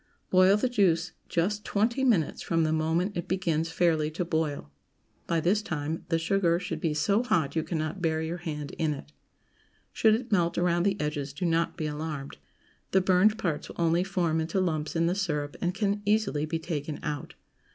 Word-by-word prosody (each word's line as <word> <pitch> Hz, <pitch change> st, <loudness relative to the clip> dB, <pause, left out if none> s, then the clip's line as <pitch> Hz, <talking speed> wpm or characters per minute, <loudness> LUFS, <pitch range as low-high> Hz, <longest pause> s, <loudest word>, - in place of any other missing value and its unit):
Boil 185 Hz, +2 st, +6 dB
the 235 Hz, -, +1 dB
juice 180 Hz, -8 st, +2 dB, 0.2 s
just 205 Hz, +5 st, 0 dB
twenty 230 Hz, +6 st, 0 dB
minutes 210 Hz, -, +2 dB
from 165 Hz, -1 st, +1 dB
the 155 Hz, 0 st, +1 dB
moment 165 Hz, +5 st, 0 dB
it 175 Hz, -, -3 dB
begins 165 Hz, -4 st, 0 dB
fairly 160 Hz, -3 st, +2 dB
to 170 Hz, +3 st, -3 dB
boil. 155 Hz, -, -2 dB, 0.6 s
By 170 Hz, -, +1 dB
this 185 Hz, +6 st, +2 dB
time 160 Hz, -5 st, -4 dB
the 165 Hz, -, +2 dB
sugar 170 Hz, 0 st, +2 dB
should 180 Hz, -, -4 dB
be 160 Hz, -5 st, 0 dB
so 200 Hz, +8 st, +2 dB
hot 170 Hz, -, 0 dB
you 160 Hz, -, +2 dB
cannot 155 Hz, +3 st, -3 dB
bear 160 Hz, -2 st, +1 dB
your 160 Hz, +2 st, -3 dB
hand 150 Hz, -4 st, -5 dB
in 155 Hz, -2 st, +1 dB
it. 145 Hz, -, -11 dB, 0.8 s
Should 220 Hz, -1 st, +4 dB
it 235 Hz, +1 st, -5 dB
melt 170 Hz, -4 st, +2 dB
around 175 Hz, 0 st, +2 dB
the 195 Hz, 0 st, 0 dB
edges, 150 Hz, -2 st, -3 dB
do 180 Hz, +5 st, -3 dB
not 165 Hz, 0 st, +1 dB
be 155 Hz, -, -2 dB
alarmed. 150 Hz, -2 st, -5 dB, 0.5 s
The 190 Hz, -, +3 dB
burned 190 Hz, +4 st, +4 dB
parts 165 Hz, -8 st, -2 dB
will -, -, -9 dB
only 170 Hz, +1 st, +3 dB
form 170 Hz, -4 st, 0 dB
into 165 Hz, +4 st, -1 dB
lumps 155 Hz, -4 st, -1 dB
in 165 Hz, 0 st, +2 dB
the 170 Hz, -, +2 dB
syrup, 150 Hz, -8 st, -2 dB
and 175 Hz, -, +1 dB
can 205 Hz, 0 st, 0 dB
easily 205 Hz, -8 st, +1 dB
be 165 Hz, +1 st, -1 dB
taken 155 Hz, -2 st, -4 dB
out. 150 Hz, -2 st, -4 dB
170 Hz, 195 wpm, -28 LUFS, 155-190 Hz, 0.8 s, Boil